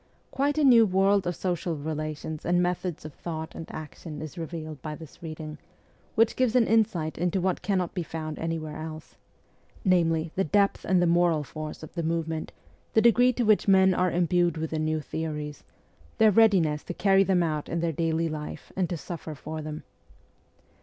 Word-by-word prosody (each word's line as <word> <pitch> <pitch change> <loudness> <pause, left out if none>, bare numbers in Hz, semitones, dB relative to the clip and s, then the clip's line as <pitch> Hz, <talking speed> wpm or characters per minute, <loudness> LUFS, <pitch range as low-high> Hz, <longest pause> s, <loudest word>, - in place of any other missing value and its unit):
Quite 285 +2 0
a 305 - +3
new 235 -5 +7
world 195 0 +3
of 175 - -1
social 175 -2 -2
relations 155 +1 -4
and 175 +1 +2
methods 180 -2 -1
of 155 - -7
thought 160 0 -6
and 165 - -8
action 155 0 -8
is 155 -3 -7
revealed 160 -3 -6
by 155 +1 -5
this 160 -2 -13
reading, 155 -2 -7 0.6
which 225 0 +3
gives 255 -2 +1
an 245 -2 +5
insight 190 -10 +1
into 180 +2 +1
what 185 0 0
cannot 185 -2 -1
be 180 - -2
found 155 -2 -5
anywhere 160 -2 -3
else 155 0 -8 0.7
namely, 165 -3 +2
the 190 - +1
depth 200 +5 +1
and 185 -2 +3
the - - +4
moral 170 -2 +3
force 155 +1 -7
of 155 - -10
the 170 - -2
movement, 160 -1 -2 0.4
the 220 - +5
degree 245 +2 +5
to 245 - 0
which 215 -2 +3
men 190 -1 +6
are 180 +1 +2
imbued 175 -1 +2
with 160 0 -3
the 160 - -1
new 155 0 0
theories, 150 -1 -5 0.5
their 220 -1 +6
readiness 185 -9 +4
to 175 - -5
carry 195 -1 +4
them 185 -2 +2
out 155 -3 -2
in 170 - -1
their 165 -1 0
daily 165 +1 0
life 155 -1 -6
and 185 -3 0
to 175 - -2
suffer 160 +1 -7
for 155 +2 -6
them. 155 0 -6
165 Hz, 185 wpm, -27 LUFS, 155-190 Hz, 0.7 s, new